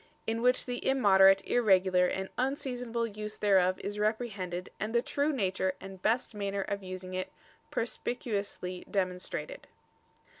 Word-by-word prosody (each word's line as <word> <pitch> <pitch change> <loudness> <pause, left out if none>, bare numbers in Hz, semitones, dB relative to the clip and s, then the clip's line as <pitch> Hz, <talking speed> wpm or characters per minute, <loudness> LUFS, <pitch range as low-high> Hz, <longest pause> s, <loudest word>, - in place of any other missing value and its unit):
In 225 +1 -1
which 250 +1 +3
the 245 -1 -4
immoderate, 195 -7 +5
irregular, 185 -5 +4
and 190 +1 -3
unseasonable 250 -3 -1
use 210 -1 -6
thereof 185 -3 +3
is 205 +1 -4
reprehended, 210 -5 -2
and 215 +3 -3
the 235 - +5
true 285 +3 0
nature 190 -6 0
and 190 -1 -10
best 230 +4 +1
manner 200 -1 -2
of 200 +1 -3
using 185 0 -7
it, 185 0 -3 0.4
perspicuously 205 -6 -3
demonstrated." 190 - -3
200 Hz, 135 wpm, -31 LUFS, 185-235 Hz, 0.4 s, immoderate